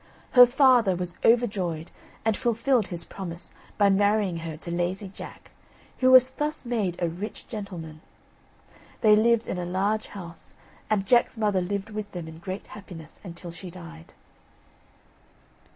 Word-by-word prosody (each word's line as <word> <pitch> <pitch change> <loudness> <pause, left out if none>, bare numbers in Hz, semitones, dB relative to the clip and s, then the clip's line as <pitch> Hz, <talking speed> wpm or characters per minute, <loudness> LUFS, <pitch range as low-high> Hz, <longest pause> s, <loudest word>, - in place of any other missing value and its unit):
Her 250 -1 +9
father 245 -6 +4
was 180 0 -4
overjoyed, 195 -9 +1 0.3
and 220 -2 +2
fulfilled 235 0 +1
his 170 -2 -5
promise 175 -3 -7 0.2
by 200 -1 +5
marrying 205 -2 +2
her 165 -1 -6
to 170 - -7
Lazy 180 +3 -2
Jack, 190 - -11 0.5
who 255 - +4
was 255 0 +8
thus 295 +1 -3
made 215 -7 -1
a 175 - +1
rich 180 +6 -6
gentleman. 175 -8 -7 1.0
They 215 -2 +7
lived 230 +1 +3
in 180 - -3
a - - -2
large 195 +5 -1
house, 170 -4 -8 0.3
and 205 -2 +1
Jack's 240 +2 +3
mother 205 -4 +1
lived 200 +3 -3
with 210 -1 -6
them 175 -3 -6
in 160 0 -10
great 185 +3 -6
happiness 170 -6 -11
until 175 -2 -8
she 180 +2 -9
died. 170 -2 -12
195 Hz, 150 wpm, -26 LUFS, 175-220 Hz, 1.0 s, Her